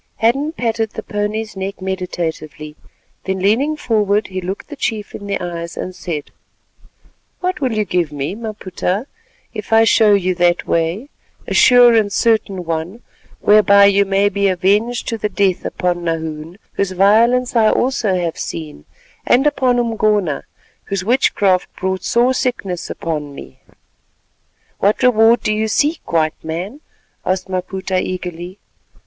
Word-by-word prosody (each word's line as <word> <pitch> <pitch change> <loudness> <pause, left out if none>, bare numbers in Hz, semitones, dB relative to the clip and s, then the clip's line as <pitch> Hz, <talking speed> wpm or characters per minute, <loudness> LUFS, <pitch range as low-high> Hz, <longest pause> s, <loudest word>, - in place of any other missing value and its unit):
Hadden 275 +7 +1
patted 225 -6 -2
the - - -6
pony's 210 +1 -3
neck 190 +1 -5
meditatively, 165 -5 -5 0.5
then 190 0 -1
leaning 235 +11 +1
forward, 210 -5 0
he 185 0 -4
looked 190 +8 -6
the 295 - -7
chief 220 -6 -3
in 200 - -8
the 200 - -2
eyes 170 -1 -6
and 185 - -4
said:— 165 -5 -6 1.1
"What 365 -3 -2
will 255 -4 0
you 215 -1 0
give 175 -4 -1
me, 145 +3 -3
Maputa, 210 -1 -3 0.5
if 215 -2 -7
I 225 0 +6
show 220 -2 +5
you 185 -2 0
that 175 0 +1
way, 170 - -1 0.4
a - - -4
sure 245 -1 +7
and 215 -3 +2
certain 200 -5 +1
one, 165 +8 -4 0.4
whereby 200 -1 +6
you 200 0 +4
may 195 +1 +2
be 200 -1 +1
avenged 200 +6 +1
to 230 -2 -3
the 210 - -1
death 195 -4 0
upon 175 -1 -2
Nahoon, 160 0 -4 0.2
whose 195 -2 -1
violence 230 +7 +3
I 220 -2 +5
also 240 -7 +1
have 170 -2 -2
seen, 75 -3 -6 0.4
and 260 +4 +4
upon 260 -4 +2
Umgona, 215 -8 0 0.4
whose 195 -1 -3
witchcraft 200 -6 +2
brought 190 0 -3
sore 245 +2 +2
sickness 200 -9 -3
upon 150 -4 -4
me?" 130 - -12 1.2
"What 205 +2 +1
reward 230 -1 +5
do 215 - 0
you 215 +1 0
seek, 295 +9 0
White 155 -2 0
Man?" 180 - -5 0.4
asked 185 0 -1
Maputa 185 0 -2
eagerly. 180 0 -6
200 Hz, 145 wpm, -18 LUFS, 180-225 Hz, 1.2 s, sure